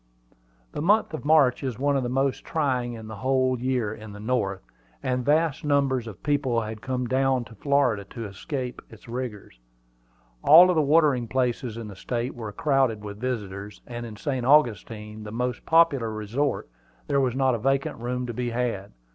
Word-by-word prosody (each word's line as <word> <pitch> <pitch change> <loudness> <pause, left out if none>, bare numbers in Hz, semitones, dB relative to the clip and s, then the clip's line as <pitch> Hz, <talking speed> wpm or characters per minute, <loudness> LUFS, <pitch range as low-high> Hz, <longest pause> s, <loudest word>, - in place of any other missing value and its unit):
The - - -4
month 205 +2 +3
of 155 - -5
March 145 -5 +4
is 130 -5 -3
one 140 +1 +1
of 135 - +2
the 120 - -2
most 135 +1 0
trying 130 -6 -1
in 110 -1 -8
the 110 -1 -8
whole 130 +1 +1
year 125 -4 -1
in 110 -2 -10
the 105 - -9
North, 105 - -1 0.4
and 125 -1 0
vast 150 +1 +2
numbers 140 -4 +1
of 105 -5 -10
people 135 -5 +1
had 110 0 -6
come 130 -1 -2
down 130 0 +1
to 115 - -13
Florida 125 -3 +1
to 115 +3 -7
escape 125 +5 -5
its 110 0 -15
rigors. 115 - -6 0.8
All 165 +4 +9
the 160 - +3
watering 145 -5 +3
places 125 -2 -1
in 115 -2 -6
the 100 - -9
State 120 +5 -3
were 110 -3 -6
crowded 135 -7 +1
with 100 0 -7
visitors, 105 -5 -4
and 120 -1 -6
in 110 - -9
St. 130 +2 -2
Augustine, 110 -6 +2
the 105 - -7
most 125 +1 -3
popular 160 -8 +4
resort, 110 +7 -2 0.4
there 140 -1 +1
was 130 -2 0
not 130 -1 +2
a 115 - -1
vacant 135 +2 0
room 125 +1 -2
to 120 - -5
be 120 +1 -2
had. 115 -5 -2
125 Hz, 185 wpm, -26 LUFS, 110-135 Hz, 0.8 s, All